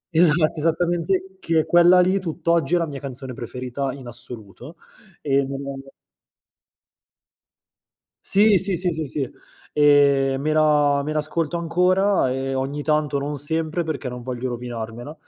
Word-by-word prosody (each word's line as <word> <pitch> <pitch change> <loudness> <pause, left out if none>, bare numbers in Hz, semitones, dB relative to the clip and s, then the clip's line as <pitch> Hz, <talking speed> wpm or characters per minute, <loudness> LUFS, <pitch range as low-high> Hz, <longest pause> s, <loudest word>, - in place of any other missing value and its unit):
Esatto, 160 -1 +3
esattamente, 175 +4 0
che 160 -2 +1
quella 175 +1 +6
lì 185 +2 +3
tutt'oggi 170 -2 0
è - - +4
la 170 - 0
mia 140 -3 -7
canzone 130 -2 -7
preferita 125 +3 -4
in 135 -3 -10
assoluto; 120 - -9 0.5
e 140 -1 +1
nella 140 +1 -5
la 135 - -16 2.4
Sì, 205 0 +4
sì, 185 -1 -1
sì, 180 0 0
sì, 160 0 -3
sì, 135 -2 -3 0.4
ehm, 140 -2 +4
me 155 +1 0
la 150 -2 +3
me 155 - -3
l'ascolto 155 +2 -1
ancora, 180 -2 +2
ehm, 135 0 -2
ogni 140 +2 -3
tanto, 150 -2 0
non 145 +1 -3
sempre, 160 +3 -1
perché 150 -4 -4
non 125 0 -6
voglio 125 +1 -4
rovinarmela; 120 +2 -6
150 Hz, 140 wpm, -22 LUFS, 135-170 Hz, 2.4 s, quella